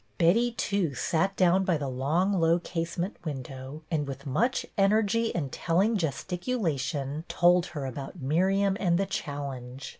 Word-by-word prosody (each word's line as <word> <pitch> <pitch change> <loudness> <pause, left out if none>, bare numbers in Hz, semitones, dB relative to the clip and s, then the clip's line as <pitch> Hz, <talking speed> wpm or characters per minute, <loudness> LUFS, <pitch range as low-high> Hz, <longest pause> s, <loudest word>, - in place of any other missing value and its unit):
Betty 230 +8 +3
too 200 - -1
sat 190 +9 0
down 185 +1 +4
by 180 -4 +2
the 145 -2 -3
long, 150 +10 +1
low 165 +1 +4
case 170 -1 -4
ment 180 +3 -3
window, 135 0 -6
and 150 -3 0
with 135 +1 -7
much 230 - +1
energy 215 +2 +2
and 145 -6 -2
telling 190 +7 +1
gesticulation 160 - -2
told 175 0 +4
her 140 - -3
about 135 +1 -6
Miriam 190 +8 +2
and 170 -3 +2
the 195 - +1
challenge. 140 -6 -5
170 Hz, 150 wpm, -28 LUFS, 140-195 Hz, -, down